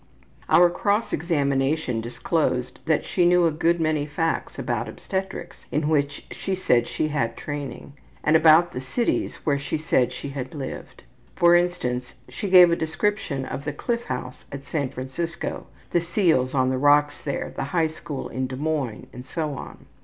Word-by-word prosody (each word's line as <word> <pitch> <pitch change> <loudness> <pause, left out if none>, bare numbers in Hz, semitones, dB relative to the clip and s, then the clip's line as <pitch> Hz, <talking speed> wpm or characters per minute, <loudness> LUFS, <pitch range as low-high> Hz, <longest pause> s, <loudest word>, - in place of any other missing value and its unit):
Our 175 +2 +6
cross 205 +5 0
examination 140 -5 0
disclosed 125 +2 -1
that 160 -2 +2
she 180 - +1
knew 175 0 +5
a 165 - +3
good 170 +2 +1
many 155 -2 0
facts 160 +3 -2
about - - -2
obstetrics, 190 0 -5
in 150 +1 0
which 145 -2 0
she 195 - -3
said 125 -10 +2
she 155 - -1
had 150 0 -2
had 115 -2 -1
training, 145 -1 -6 0.3
and 155 - +3
about 160 +2 +6
the 125 - -5
cities 230 - -1
where 140 -2 +2
she 140 - -2
said 130 -5 +1
she 135 +2 -6
had 135 0 -6
lived. 140 -2 -7 0.3
For 170 0 +5
instance, 175 -9 0
she 200 - -4
gave 180 -2 +8
a - - +4
description 160 -4 -1
of 140 - -5
the 150 0 -3
Cliff 235 +10 -2
House 125 0 -5
at 140 0 -7
San 140 -3 -1
Francisco, 130 +7 -5 0.2
the 175 - +3
seals 165 -7 +1
on 130 -1 +3
the 130 - -1
rocks 145 +1 +4
there, 140 - -3
the - - -2
high 165 +3 +1
school 155 -3 -5
in 130 0 -3
Des 130 - -6
Moines, 145 -5 -2
and 125 - -8
so 150 +2 -3
on. 135 - -9
150 Hz, 175 wpm, -24 LUFS, 135-170 Hz, 0.3 s, gave